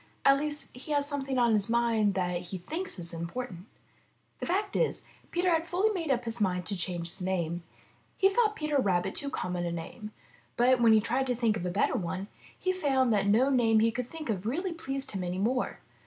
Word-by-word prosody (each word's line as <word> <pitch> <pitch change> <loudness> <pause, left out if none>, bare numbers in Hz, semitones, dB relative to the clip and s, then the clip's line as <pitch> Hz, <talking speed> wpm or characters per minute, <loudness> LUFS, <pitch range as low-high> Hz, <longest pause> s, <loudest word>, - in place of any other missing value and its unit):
At 275 0 +6
least 295 -2 -2
he 280 +4 -5
has 285 -1 +2
something 275 -2 -1
on 240 -2 +4
his 210 0 +2
mind 230 -4 +2
that 180 -2 -1
he 180 +2 -6
thinks 315 - -4
is 170 -1 -4
important. 175 +3 -5 0.7
The - - -4
fact 395 +4 0
is, 485 - +1 0.2
Peter 355 +1 +1
had 325 0 +1
fully 380 +6 +2
made 340 -7 -3
up 245 -3 +1
his 230 0 -2
mind 180 -3 +1
to 200 - -2
change 175 -2 -1
his 185 - -6
name. 175 -2 -1 0.6
He 385 - +5
thought 425 +1 +2
Peter 305 -4 0
Rabbit 180 -7 +1
too 280 - -2
common 180 -8 -3
a 170 - -2
name. 190 +6 -6 0.5
But 250 +1 +4
when 230 -1 +7
he 215 - +6
tried 255 +4 0
to 250 - +1
think 230 -3 +1
of 180 -4 -3
a - - 0
better 195 +7 +1
one, 185 +2 -4 0.3
he 370 - 0
found 270 -9 +2
that 200 -1 +2
no 240 +7 +4
name 230 -4 +4
that 215 - +5
he 230 - +3
could 245 +1 -4
think 325 -1 -7
of 200 0 -3
really 345 +9 -1
pleased 275 -4 -3
him 190 -2 -3
any 180 +1 -3
more. 245 +6 0
235 Hz, 225 wpm, -29 LUFS, 185-285 Hz, 0.7 s, when